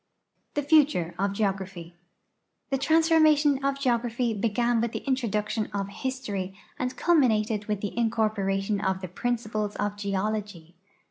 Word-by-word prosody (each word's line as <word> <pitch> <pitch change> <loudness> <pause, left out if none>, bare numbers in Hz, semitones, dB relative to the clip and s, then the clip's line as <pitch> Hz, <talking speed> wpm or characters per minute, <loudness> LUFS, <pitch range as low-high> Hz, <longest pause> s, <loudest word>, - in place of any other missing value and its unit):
THE 290 - 0
FUTURE 285 - +3
OF 200 0 +1
GEOGRAPHY 190 -4 -3 0.8
The 270 - +2
transformation 310 -3 +4
of 275 0 +1
geograi)hy 235 -4 0
began 235 +1 +1
with 235 -1 -1
the - - -5
introduction 215 -4 0
of 195 -1 -2
history 205 -6 -4 0.2
and 250 0 -2
culminated 220 -10 +2
with 210 -2 -2
the 205 - -4
incorporation 210 -3 0
of 190 0 0
the 185 - -4
principles 215 +1 -2
of 205 0 -2
geology. 200 -3 -3
215 Hz, 130 wpm, -27 LUFS, 200-255 Hz, 0.8 s, transformation